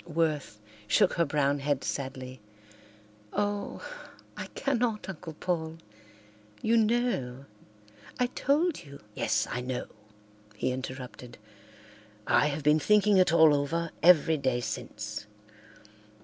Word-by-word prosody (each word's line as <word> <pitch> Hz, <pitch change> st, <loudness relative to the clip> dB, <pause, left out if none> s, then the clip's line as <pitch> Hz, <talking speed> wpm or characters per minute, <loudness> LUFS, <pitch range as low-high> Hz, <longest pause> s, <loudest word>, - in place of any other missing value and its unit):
Worth 155 Hz, -8 st, -1 dB, 0.3 s
shook 200 Hz, -, +4 dB
her 170 Hz, -, +2 dB
brown 145 Hz, -1 st, +1 dB
head 140 Hz, -1 st, -1 dB
sadly. 130 Hz, -2 st, -5 dB, 0.9 s
"Oh, 205 Hz, 0 st, -2 dB, 0.5 s
I -, -, -6 dB
cannot, 245 Hz, -5 st, 0 dB
Uncle 170 Hz, -3 st, -7 dB
Paul. 160 Hz, -2 st, -2 dB, 0.9 s
You 225 Hz, +1 st, +3 dB
know—I 135 Hz, -, -2 dB
told 290 Hz, -, 0 dB
you—" 140 Hz, -5 st, -13 dB
"Yes, 110 Hz, +1 st, +1 dB
I 125 Hz, -, -2 dB
know," 125 Hz, 0 st, -3 dB, 0.7 s
he 115 Hz, -, -1 dB
interrupted. 125 Hz, -1 st, -7 dB, 0.9 s
"I -, -, +4 dB
have 145 Hz, 0 st, -3 dB
been 150 Hz, +2 st, +5 dB
thinking 210 Hz, +3 st, +4 dB
it 185 Hz, -3 st, +5 dB
all 160 Hz, -2 st, +7 dB
over 165 Hz, +4 st, -1 dB
every 160 Hz, -2 st, +6 dB
day 130 Hz, -3 st, 0 dB
since. 105 Hz, -1 st, -5 dB
150 Hz, 110 wpm, -29 LUFS, 130-185 Hz, 0.9 s, all